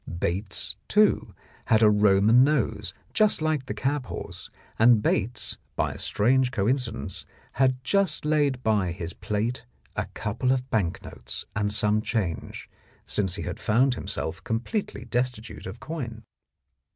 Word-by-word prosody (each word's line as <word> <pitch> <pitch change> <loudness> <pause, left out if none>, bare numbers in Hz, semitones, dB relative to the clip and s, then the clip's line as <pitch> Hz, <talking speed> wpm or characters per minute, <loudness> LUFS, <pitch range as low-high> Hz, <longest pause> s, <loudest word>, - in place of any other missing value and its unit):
Bates, 95 +4 -1
too, 210 0 +3 0.3
had 110 0 +4
a 105 - +8
Roman 105 +3 +5
nose, 120 - 0 0.2
just 215 -1 +3
like 155 -4 0
the - - -2
cab 135 -2 -1
horse, - - -7 0.3
and 115 0 +7
Bates, 110 +2 -1 0.2
by - - 0
a - - -9
strange 130 +4 +2
coincidence, 115 -3 -1 0.3
had 130 -1 +1
just 195 +3 +1
laid 145 -4 +1
by 100 -6 +2
his 85 -1 -5
plate 115 +4 -2 0.3
a - - -2
couple 125 - -1
of 130 -1 0
bank 95 -3 0
notes - - -8
and 105 -1 0
some 105 0 +2
change, 105 -8 -3 0.4
since 95 -4 0
he - - -5
had - - -5
found 125 +5 +3
himself 90 -5 -5
completely 120 - -3
destitute 120 -3 -3
of 95 +5 -8
coin. 120 -9 -6
115 Hz, 140 wpm, -26 LUFS, 105-130 Hz, 0.4 s, a